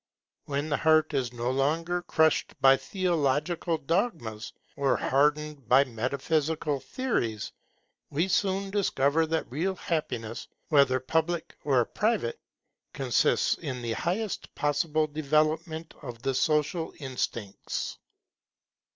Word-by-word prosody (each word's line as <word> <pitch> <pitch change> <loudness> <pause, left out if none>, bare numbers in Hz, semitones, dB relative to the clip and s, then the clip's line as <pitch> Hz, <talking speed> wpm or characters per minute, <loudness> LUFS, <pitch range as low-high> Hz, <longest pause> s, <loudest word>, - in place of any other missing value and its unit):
When 145 +2 -2
the 150 - +1
heart 155 -1 +3
is 130 -4 0
no 120 +1 -2
longer 165 +6 0
crushed 160 -3 +1
by 135 0 +7
theological 165 -1 0
dogmas, 155 - -2 0.2
or 140 -1 +2
hardened 150 -1 +1
by 135 +2 +7
metaphysical 140 +4 -1
theories, 120 - -2 0.6
we 165 +6 0
soon 195 +1 0
discover 160 -6 +2
that 160 -5 -2
real 180 +8 -1
happiness, 120 -11 -3 0.2
whether 140 -4 +4
public 160 +5 -1
or 130 -5 +3
private, 210 - -1 0.5
consists - - +2
in 125 -2 -5
the 115 - -2
highest 190 - -3
possible 150 +1 +1
development 155 +2 0
of 120 -3 -8
the 135 - 0
social 155 +4 0
instincts. 120 -6 -4
150 Hz, 110 wpm, -28 LUFS, 135-165 Hz, 0.6 s, by